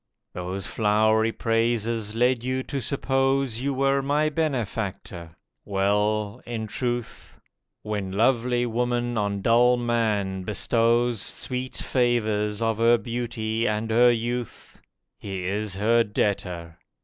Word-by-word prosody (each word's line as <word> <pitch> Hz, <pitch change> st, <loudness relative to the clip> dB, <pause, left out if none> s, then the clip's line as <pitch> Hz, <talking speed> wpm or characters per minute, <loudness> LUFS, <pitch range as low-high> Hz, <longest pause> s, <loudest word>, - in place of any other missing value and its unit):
Those 90 Hz, +2 st, -5 dB
flowery 110 Hz, +1 st, +2 dB
praises 115 Hz, -1 st, 0 dB
led 120 Hz, 0 st, +2 dB
you 130 Hz, +1 st, -1 dB
to 135 Hz, 0 st, -4 dB
suppose 135 Hz, -1 st, 0 dB
You 140 Hz, +1 st, 0 dB
were 135 Hz, +1 st, +2 dB
my 145 Hz, +3 st, +1 dB
benefactor. 110 Hz, -, -3 dB, 0.3 s
Well, 105 Hz, +1 st, 0 dB
in 115 Hz, -2 st, -4 dB
truth, 120 Hz, +2 st, -4 dB, 0.4 s
When 105 Hz, -3 st, -3 dB
lovely 120 Hz, +3 st, +2 dB
woman 120 Hz, +1 st, -1 dB
on 100 Hz, -2 st, -1 dB
dull 120 Hz, +2 st, +5 dB
man 110 Hz, -5 st, 0 dB
bestows 115 Hz, +3 st, +1 dB
Sweet 130 Hz, 0 st, -4 dB
favours 110 Hz, -4 st, 0 dB
of 115 Hz, -1 st, 0 dB
her 115 Hz, +1 st, +5 dB
beauty 115 Hz, 0 st, -2 dB
and 105 Hz, +1 st, -1 dB
her 120 Hz, +2 st, +6 dB
youth, 120 Hz, 0 st, -4 dB, 0.4 s
He 95 Hz, -2 st, -5 dB
is 100 Hz, +1 st, -2 dB
her 115 Hz, +4 st, +3 dB
debtor. 90 Hz, -5 st, -2 dB
115 Hz, 115 wpm, -25 LUFS, 105-120 Hz, 0.4 s, her